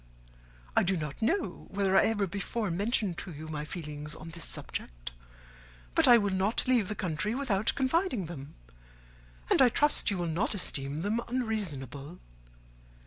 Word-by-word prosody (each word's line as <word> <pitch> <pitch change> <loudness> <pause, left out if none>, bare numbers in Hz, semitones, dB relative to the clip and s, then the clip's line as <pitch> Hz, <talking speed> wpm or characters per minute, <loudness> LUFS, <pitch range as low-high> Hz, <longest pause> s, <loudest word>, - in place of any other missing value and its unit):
I - - +6
do 190 +1 +2
not 150 +1 -5
know 335 - -1
whether 195 -1 +1
I - - +6
ever 215 -3 +1
before 200 +2 -2
mentioned 200 0 +1
to 185 - -6
you 155 0 -8
my 150 -1 -4
feelings 150 -3 -4
on 165 +1 -9
this 170 -2 -4
subject, - - -5 0.8
but - - +5
I 240 - +9
will 205 -3 0
not 195 +4 +1
leave 245 -6 +3
the 210 - -3
country 185 +4 -1
without 220 -6 +1
confiding 270 - +1
them, 145 -4 -8 1.0
and - - +5
I 255 - +8
trust 295 +5 +3
you 200 - -1
will 175 - -1
not 175 +8 0
esteem 145 -4 -1
them 215 +4 0
unreasonable. 175 - -3
190 Hz, 160 wpm, -30 LUFS, 155-225 Hz, 1.0 s, I